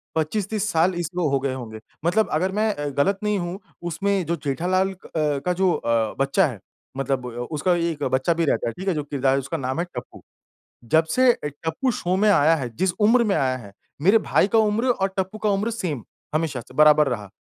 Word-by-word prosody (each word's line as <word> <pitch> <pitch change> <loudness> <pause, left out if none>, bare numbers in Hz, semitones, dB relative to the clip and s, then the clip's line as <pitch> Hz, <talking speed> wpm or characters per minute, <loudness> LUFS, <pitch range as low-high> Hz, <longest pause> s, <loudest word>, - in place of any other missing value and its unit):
25-30 205 +6 -1
साल 170 +3 +3
इसको 175 0 -1
हो 135 -1 +1
गए 135 -1 -2
होंगे 110 -4 -7 0.3
मतलब 210 +6 +2
अगर 185 +5 +1
मैं 215 +1 +1
अ, 145 0 -3
गलत 165 +9 +1
नहीं 210 -2 +1
हूँ 175 +3 -4 0.2
उसमें 190 +2 -1
जो 170 +2 0
जेठालाल 185 +7 +1
अ, - - -17 0.2
का 150 +3 0
जो 185 0 +2
अ, 115 -2 0
बच्चा 140 +7 +3
है 120 -8 -7 0.4
मतलब 135 -2 -1
उ 125 - -5 0.2
उसका 175 +4 +1
एक 165 -4 -2
बच्चा 130 +6 +1
भी 165 0 0
रहता 140 - 0
है, 115 - -2
ठीक 190 +2 -8
है 190 - +3
जो 150 -2 -2
किरदार 140 -2 0
है 135 - +2
उसका 135 +5 -4
नाम 130 +3 -3
है, 175 - 0
टप्पू। 125 - -8 0.7
जब 160 0 +5
से 255 0 +5
अ, - - -7
टप्पू 160 - -2
शो 185 -4 -1
में 210 +2 +3
आया 165 -4 +5
है, 130 -5 -3
जिस 190 -2 +1
उम्र 235 +3 +5
में 205 -3 +1
आया 130 -1 +1
है, 100 -5 -11 0.3
मेरे 200 +7 +6
भाई 200 - +2
का - - +7
उम्र 220 +2 +2
और 195 -5 +1
टप्पू 190 +2 -2
का 215 -1 0
उम्र 205 +3 0
सेम 170 - -3 0.3
हमेशा 155 -5 -1
से 125 - -16
बराबर 150 0 +6
रहा, 105 -5 -4
165 Hz, 225 wpm, -23 LUFS, 140-195 Hz, 0.7 s, का